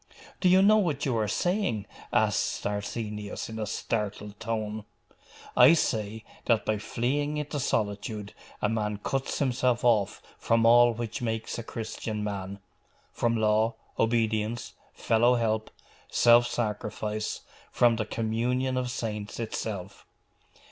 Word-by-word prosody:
'Do 185 - +4
you 190 +1 +6
know 215 +2 +6
what 155 -8 0
you 130 -4 0
are 110 -2 +1
saying?' 175 - 0 0.3
asked - - +1
Arsenius 105 +1 -4
in 110 0 -6
a 110 - -2
startled 105 -1 -3
tone. 110 -1 -3 0.7
'I - - +8
say, 110 -7 -1 0.2
that 115 -3 +2
by 110 -1 0
fleeing 145 +7 -1
into 150 0 -3
solitude 105 -3 -2 0.3
a - - +4
man 105 -2 -1
cuts 135 +6 -2
himself 125 -3 +1
off 105 -5 +3 0.2
from 115 0 +2
all 120 +1 +7
which 115 0 -5
makes 115 -1 -3
a - - -5
Christian 110 -1 -5
man; 100 -1 -4 0.5
from 115 -1 0
law, 110 +1 +2 0.2
obedience, 115 0 0 0.2
fellow 120 +2 +3
help, 110 -2 0 0.4
self 120 0 +5
sacrifice 105 -1 -3 0.3
from 120 -2 +4
the 110 - -1
communion 120 +4 -1
of 125 -1 -1
saints 105 -3 -4
itself. 105 -4 -5
115 Hz, 130 wpm, -28 LUFS, 105-120 Hz, 0.7 s, I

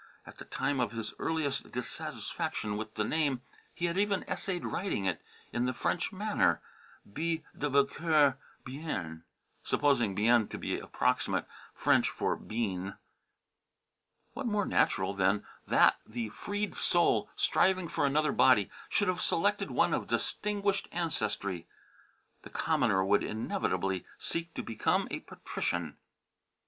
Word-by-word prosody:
At - - -13
the - - -8
time 140 -2 -1
of 115 -3 0
his 115 -2 -4
earliest 155 -4 -1
dissatisfaction 110 -3 -3
with 110 +1 -5
the 110 - +1
name 140 0 0 0.3
he 175 - -3
had 170 +2 0
even 205 -1 +1
essayed 180 -3 -2
writing 180 - -1
it 90 -4 0 0.3
in 120 +1 +1
the 125 - 0
French 175 - 0
manner 200 - +2 0.5
"B. 165 +1 -1
de 145 - -1
Boncoeur 140 0 +3 0.3
Bien" 95 - -4 0.4
supposing 120 -9 +2
"Bien" 115 +2 +4
to - - -6
be - - -2
approximate - - 0 0.3
French - - +3
for - - -1
"Bean." 100 -4 -3 1.4
What 270 0 -3
more 210 -3 +1
natural 95 +1 +2
than 95 +1 +2 0.2
that - - +5
the 115 0 -4
freed 205 - -3
soul, 175 -1 +2
striving 185 -2 +3
for - - -1
another 150 +1 +2
body, 105 -7 +5 0.2
should 205 - +2
have 180 -1 0
selected 205 +5 +1
one - - +2
of - - -1
distinguished 205 -1 0
French - - -9
ancestry? 100 - -2 0.7
The - - -11
commoner 95 -1 +2
would 100 +1 +3
inevitably 95 -3 -1
seek 165 0 -2
to - - -3
become 115 - +1
a - - -2
patrician. 85 -3 -3
135 Hz, 135 wpm, -31 LUFS, 105-170 Hz, 1.4 s, that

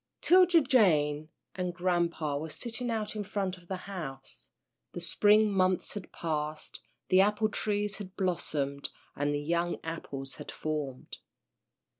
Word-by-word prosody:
'Tilda 360 -1 +6
Jane 155 - +3 0.2
and 180 -2 -3
grampa 170 -4 0
were 155 +3 -3
sitting 240 +7 -4
out 220 -2 -2
in 210 - -2
front 195 -1 -2
of 175 - -21
the 190 - -2
house. 150 -9 -7 0.4
The - - -4
spring 210 +5 +4
months 185 -1 +2
had 200 -4 -7
passed, 155 -2 -3 0.3
the 185 0 +6
apple 210 +2 +2
trees 205 -1 -1
had 190 -2 -8
blossomed, 145 -6 -1 0.3
and 145 +1 0
the 145 - 0
young 170 +3 0
apples 140 -4 -5
had - - -8
formed. 150 -4 -4
180 Hz, 140 wpm, -30 LUFS, 155-205 Hz, 0.4 s, Tilda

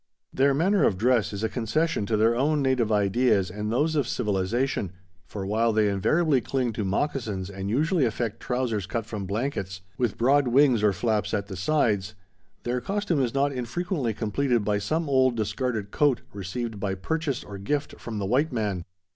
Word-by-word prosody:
Their 135 +1 +3
manner 185 +4 +3
of 95 - +2
dress 120 +1 +2
is 100 +1 -5
a - - +2
concession 125 +2 -1
to 110 - +1
their 115 +2 +3
own 145 +3 +1
native 130 -4 +1
ideas 105 -1 +2
and 105 +1 -3
those 150 +7 +1
of 140 -6 +1
civilization, 105 -1 -1 0.3
for 100 -2 -5
while 110 +3 +2
they 110 -1 +3
invariably 140 - +2
cling 125 -1 -1
to 105 - -2
moccasins 100 -3 -2
and 95 0 -5
usually 155 - +2
affect 115 -1 -2
trousers 120 -6 -2
cut 115 +1 -3
from 105 -4 -5
blankets 100 -4 -3 0.2
with 120 -4 0
broad 135 +3 +3
wings 130 -2 +4
or 105 -1 +4
flaps 110 +2 0
at 100 -1 -2
the 100 -1 -7
sides, 105 - 0 0.5
their 125 +1 -1
costume 195 -1 0
is 125 0 -1
not 140 +1 +2
infrequently 130 - -2
completed 120 +1 0
by 105 0 +1
some 155 +10 -1
old 130 -3 +3
discarded 110 -1 -2
coat 145 -4 +2
received 105 +3 -4
by 100 -1 -2
purchase 145 - -2
or 100 -1 -8
gift 145 +9 -2
from 115 -2 -6
the 100 - -2
white 135 +10 +1
man. 105 -7 -2
115 Hz, 180 wpm, -26 LUFS, 105-135 Hz, 0.5 s, wings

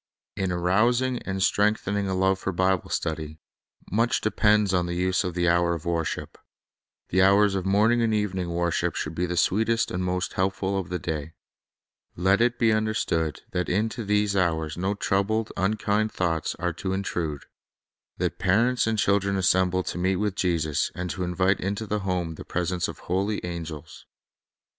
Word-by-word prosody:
In 95 -2 -1
arousing 120 +9 +2
and 95 0 -1
strengthening 100 -1 +1
a 95 - -1
love 95 +1 +2
for 95 - -2
Bible 95 0 +1
stud} 80 -1 -1
r, 80 - -5 0.6
much 115 +5 +2
depends 105 -2 +2
on 90 -1 +1
the 85 - -3
use 90 +1 +1
of 90 -2 -4
the 90 0 +1
hour 85 0 +3
of 80 - -8
wor 85 -1 0
ship. - - -5 0.7
The 95 - +3
hours 100 +1 +5
of 95 -1 -2
morning 110 +5 +3
and 115 -1 +2
evening 95 -4 -1
worship 85 0 0
should 80 - -3
be 90 +2 -1
the 90 0 -3
sweetest 115 +6 +2
and 90 +1 -2
most 90 0 -2
helpful 95 +1 -1
of 90 - -6
the 90 - -2
day. 80 -2 -4 0.8
Let 95 +4 +2
it 120 0 +2
be 115 -2 +3
understood 110 -8 0
that 90 -1 -1
into 110 +4 -1
these 105 0 +1
hours 80 -4 0
no 95 +4 -1
troubled, 105 +3 0
unkind 105 +2 0
thoughts 85 -3 -1
are - - -2
to 95 - -3
intrude; 85 -6 -3 0.7
that - - -2
parents 115 +7 +2
and 110 -1 0
chil 100 0 +3
dren 100 0 -2
assemble 95 -1 +2
to 90 - -4
meet 95 +2 +1
with 105 +1 -1
Jesus, 80 -6 0
and 90 -1 -3
to 90 +5 -3
invite 95 +2 +1
into 100 +3 -3
the 105 0 -1
home 90 -4 -2
the - - -9
presence 90 0 -1
of - - -7
holy 100 +4 -1
angels. 85 -4 -7
95 Hz, 180 wpm, -25 LUFS, 90-105 Hz, 0.8 s, hours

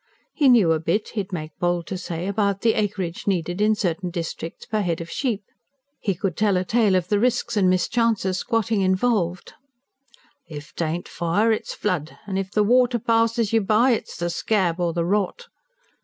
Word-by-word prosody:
He 285 -4 +4
knew 220 -9 +5
a 160 - +2
bit, 170 +7 -1
he'd 205 -3 -4
make 155 -3 -5
bold 175 -1 0
to 190 - -5
say, 175 -1 -5
about 200 0 0
the 225 -1 +3
acreage 195 -5 -2
needed 175 0 -1
in 215 +1 +4
certain 180 -2 -2
districts 165 -1 -6
per 215 -1 -1
head 170 -4 -1
of 170 0 -7
sheep; 230 -7 -2 0.6
he 195 -3 -1
could 185 -1 -2
tell 205 -2 +2
a 180 - -1
tale 220 -2 +3
of 180 -1 0
the 205 - +2
risks 240 0 0
and 190 -3 +3
mischances 190 0 +1
squatting 225 -3 0
involved: 185 -2 0 0.9
"If 150 -1 -9
t'aint 165 +1 -3
fire 200 +7 +1
it's 220 - -2
flood, 175 -7 -2
an' 195 -1 -2
if 190 0 -4
the 210 - +2
water 245 +2 +3
passes 230 -1 +1
you 225 - +4
by 220 +6 +3
it's 230 - -2
the 175 0 -2
scab 180 -2 0
or 175 -1 +1
the 170 0 -1
rot." 205 - -1
195 Hz, 185 wpm, -23 LUFS, 175-220 Hz, 0.9 s, knew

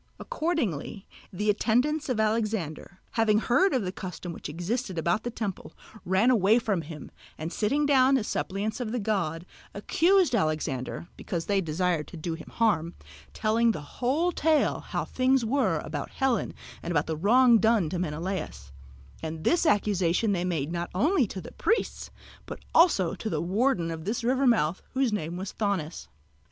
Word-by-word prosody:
Accordingly 255 - -2 0.3
the 210 +3 +1
attendants 255 +8 +1
of 245 -4 0
Alexander, 215 -6 -1
having 220 -2 +3
heard 300 - +3
of 255 -5 +1
the 180 - -3
custom 180 -2 -7
which - - -7
existed 185 - -3
about 170 +6 +1
the 240 - -4
temple, 215 -5 -5 0.3
ran 190 +7 +3
away 215 -1 +4
from 210 -7 0
him, 155 -2 -9 0.3
and 160 +3 -5
sitting 280 +8 +1
down 270 -1 +5
as 215 - -3
suppliants 205 +4 -2
of 235 -3 -3
the 245 - -1
god, 175 -6 -1 0.3
accused 345 - +3
Alexander, 155 - -1
because 170 -2 -4
they 200 -1 +1
desired 165 -1 -1
to 175 - -10
do 165 +1 -3
him 160 - -9
hurt, 175 -7 +2 0.4
telling 225 +1 +2
the 150 -5 -10
whole 300 +9 +2
tale 315 -2 +2
how - - -4
things 260 -1 +2
were 270 +5 +1
about - - -4
Helen 265 -5 -1 0.3
and - - -6
about 155 -4 +1
the 160 - -2
wrong 235 +7 +5
done 220 -6 +3
to 180 - -2
Menalaos; 155 - -4 0.5
and 160 0 -5
this 340 -1 +2
accusation 205 - +2
they 180 -3 0
made 165 -4 -2
not 175 0 -3
only 285 - +3
to 190 - -6
the 175 - -9
priests 445 +7 -1 0.4
but - - -6 0.2
also 255 - +4
to 220 +3 -4
the - - -1
warden 185 -2 +1
of 160 0 -6
this 230 +4 -2
river 260 +3 +2
mouth, 185 -8 +2
whose 260 -4 +1
name 175 -4 -3
was 190 +1 -5
Thonis. 190 - -2
205 Hz, 170 wpm, -27 LUFS, 170-245 Hz, 0.5 s, down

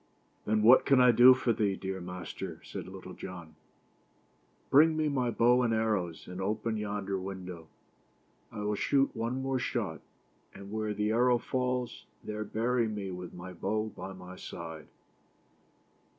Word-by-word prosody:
"Then 105 0 +1
what 120 +4 +8
can 135 -2 +4
I 125 -1 +7
do 125 +3 +8
for 125 -2 +1
thee, 100 -3 0
dear 95 -1 -5
master?" 90 0 -6
said - - -7
Little - - -9
John. 85 -4 -9 0.6
" - - -38
Bring 155 +3 +6
me 155 -1 +1
my 130 -4 0
bow 120 +2 +4
and 115 -2 +2
arrows, 105 -7 -1
and 90 +1 -6
open 110 +3 -1
yonder 100 -2 -3
window. 90 -3 -7 0.8
I 105 - -6
will 105 0 0
shoot 135 +6 +1
one 120 +4 -2
more 135 -1 0
shot, 105 - -2 0.5
and 100 0 -10
where 110 -1 -2
the 105 +1 0
arrow 120 +2 +4
falls, 125 0 -2 0.2
there 105 0 -4
bury 115 +3 0
me 105 -3 -4
with 90 0 -7
my 90 +1 -8
bow 110 +5 -2
by 95 +1 -7
my 90 0 -10
side." 80 -2 -8
105 Hz, 160 wpm, -30 LUFS, 95-125 Hz, 0.8 s, what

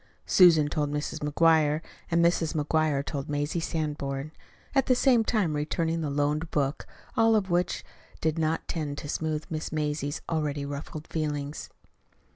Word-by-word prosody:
Susan 165 -5 +6
told 150 -1 -1
Mrs. 150 0 -3
McGuire, 155 0 +3 0.3
and 170 0 +3
Mrs. 170 -1 +1
McGuire 150 -2 +1
told 140 -1 -4
Mazie 145 +3 -1
Sanborn, 150 -3 -3 0.4
at 270 -2 +2
the 255 - +5
same 245 -3 +4
time 205 -9 +1
returning 165 +2 -1
the 150 - -2
loaned 150 +3 0
book 140 -1 -1 0.3
all 225 0 +4
of 195 -4 0
which 175 0 0 0.3
did 160 +1 0
not 160 0 0
tend 150 -4 -3
to 145 - -6
smooth 155 0 -2
Miss 155 0 -3
Mazie's 150 -1 -2
already 150 -3 -1
ruffled 145 +2 -6
feelings. 150 -2 -3
155 Hz, 150 wpm, -28 LUFS, 145-165 Hz, 0.4 s, Susan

